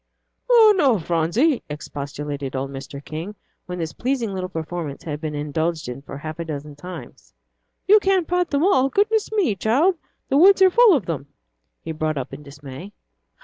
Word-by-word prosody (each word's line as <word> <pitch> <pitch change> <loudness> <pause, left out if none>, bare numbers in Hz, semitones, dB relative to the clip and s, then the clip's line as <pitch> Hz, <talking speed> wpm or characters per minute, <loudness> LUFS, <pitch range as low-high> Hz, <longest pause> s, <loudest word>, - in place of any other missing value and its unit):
"Oh, 450 -3 +7
no, 275 - +3
Phronsie," 175 - +1
expostulated 145 -1 -6
old 135 +1 -3
Mr. 140 +1 -8
King, 165 +7 -6 0.3
when 180 0 -5
this 165 -2 -4
pleasing 245 -5 -2
little 185 -1 -4
performance 160 -3 -5
had 150 -2 -5
been 155 -2 -4
indulged 155 +2 -2
in 125 +2 -6
for 140 - -9
a - - -7
half 155 +1 -6
a 170 - -3
dozen 150 -2 -6
times. 160 - -11 0.5
"You 420 +2 +7
can't 385 -4 +1
pat 360 0 0
them 285 +1 +1
all; 270 -8 +3
goodness 420 - +1
me, 390 - +1
child, 290 - +2 0.3
the 270 - +2
woods 385 +5 +7
are 375 - +6
full 460 -3 +6
of 240 - -1
them," 145 -5 -4 0.6
he 165 - -5
brought 155 -1 -2
up 135 0 -5
in 140 - -8
dismay. 145 +6 -10
170 Hz, 185 wpm, -22 LUFS, -, 0.6 s, Oh